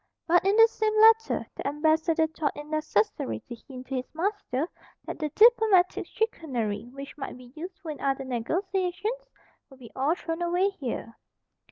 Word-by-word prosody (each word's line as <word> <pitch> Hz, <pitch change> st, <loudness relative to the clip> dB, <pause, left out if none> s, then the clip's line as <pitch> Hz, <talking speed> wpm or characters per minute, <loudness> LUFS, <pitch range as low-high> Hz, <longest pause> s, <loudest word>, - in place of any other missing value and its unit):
But 350 Hz, +2 st, +4 dB
in 390 Hz, +2 st, +3 dB
the 450 Hz, 0 st, +8 dB
same 435 Hz, -1 st, 0 dB
letter 450 Hz, +1 st, +5 dB
the -, -, -4 dB
Ambassador 315 Hz, +2 st, +2 dB
thought 315 Hz, -2 st, -3 dB
it 295 Hz, -, -7 dB
necessary 220 Hz, -, -1 dB
to 240 Hz, -, -9 dB
hint 255 Hz, -2 st, -9 dB
to 265 Hz, 0 st, -3 dB
his 255 Hz, +4 st, -6 dB
master 345 Hz, -, -1 dB, 0.4 s
that -, -, -6 dB
the 305 Hz, -2 st, -1 dB
diplomatic 430 Hz, -2 st, +4 dB
chicanery 245 Hz, -, -2 dB
which 275 Hz, +1 st, -9 dB
might 270 Hz, -, -6 dB
be 250 Hz, 0 st, -15 dB
useful 335 Hz, 0 st, -7 dB
in 295 Hz, -, -9 dB
other 270 Hz, -1 st, 0 dB
negotiations 375 Hz, -, -2 dB, 0.4 s
would 270 Hz, -, -16 dB
be 245 Hz, -3 st, -13 dB
all 285 Hz, +6 st, +1 dB
thrown 330 Hz, -1 st, -5 dB
away 355 Hz, +3 st, +2 dB
here. 250 Hz, -10 st, -6 dB
320 Hz, 165 wpm, -27 LUFS, 270-385 Hz, 0.4 s, the